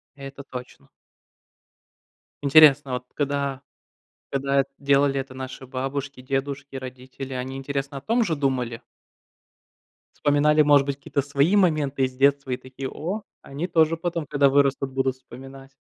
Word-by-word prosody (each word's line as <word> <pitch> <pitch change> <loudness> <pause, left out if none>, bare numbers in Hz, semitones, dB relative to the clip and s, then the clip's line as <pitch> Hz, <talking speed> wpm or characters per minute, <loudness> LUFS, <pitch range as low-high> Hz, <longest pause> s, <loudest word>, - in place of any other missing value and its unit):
Это 140 0 -9
точно. 125 -2 -10 1.5
Интересно, 145 -1 +6
а - - -2
вот 125 0 -6
когда 140 -2 -2 0.7
когда 140 0 +1
делали 140 -1 +2
это 135 0 -6
наши 130 0 -7
бабушки, 135 +1 -4
дедушки, 135 +1 -3
родители, 130 +1 -8
они, 130 +1 -4
интересно, 140 +1 -4
о - - -7
том 230 - +1
же 165 -6 -1
думали? 125 -5 -2 1.3
Вспоминали, 150 +1 +3
может 145 -2 +5
быть, 140 -1 -3
какие-то 140 0 -2
свои 140 +7 +2
моменты 150 -8 +2
из 130 0 -1
детства 140 0 +2
и 125 - 0
такие: 130 +1 -7
"О, 190 +8 -4 0.2
они 150 +6 -5
тоже 165 -1 +3
потом, 170 -2 -3
когда 140 -1 +3
вырастут, 135 -1 +2
будут 130 0 0
вспоминать!" 135 +2 -13
140 Hz, 140 wpm, -24 LUFS, 130-145 Hz, 1.5 s, Интересно